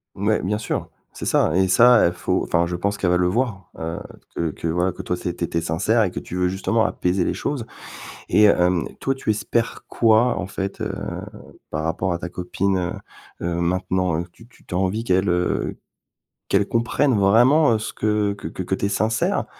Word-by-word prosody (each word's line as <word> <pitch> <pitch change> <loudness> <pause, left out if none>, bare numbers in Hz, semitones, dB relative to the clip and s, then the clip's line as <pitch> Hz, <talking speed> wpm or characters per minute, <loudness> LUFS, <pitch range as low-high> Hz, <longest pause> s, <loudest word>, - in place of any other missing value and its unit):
Ouais 105 +2 +1
bien 105 +3 0
sûr. 105 - -3 0.2
C'est - - -7
ça 80 - +2
et 95 +1 +3
ça 120 +5 +6
et - - 0
faut 90 - -1
enfin 85 +1 +1
je 90 - -3
pense 100 +3 -1
qu'elle 90 - 0
va 90 - +3
le 90 0 +2
voir, 100 -2 -1
heu, 80 +1 -4 0.4
que 85 -2 -1
que 85 - -5
voilà 90 +3 +1
que - - -8
toi 90 - -2
toi 90 - -11
tu - - -3
é - - -3
tu 90 - -4
étais 85 0 -2
sincère 95 +8 +1
et 95 - -1
que - - -4
tu - - -8
veux 90 0 +1
justement 110 +4 +1
apaiser 90 -3 0
les - - 0
choses 135 -6 -3 0.6
et 105 - +5
hem, 90 -3 +3
toi 135 - 0
tu 130 - -5
espères 110 +2 -2
quoi 115 0 +3
en 95 - -2
fait, 95 0 -5
heu, - - -1 0.8
par 75 - -2
rapport 85 +3 -1
à 85 - -3
ta 90 - -5
copine, 95 +2 -1
heu 90 0 -2 0.5
heu, 85 - -1
maintenant? 90 -1 0
Heu, 85 - -3
tu 115 - -17
tu 120 - -23
as - - +2
envie 95 +4 0
qu'elle, 95 -3 +2
heu, 90 0 0 0.7
qu'elle 100 - +2
comprenne 120 +3 +1
vraiment, 120 +8 +5
heu, 110 - +1
ce 110 - -5
que 105 -1 0
que 100 - -7
que 95 +1 -3
tu 100 - -2
es - - +1
sincère? 110 +2 0
95 Hz, 215 wpm, -22 LUFS, 90-110 Hz, 0.8 s, ça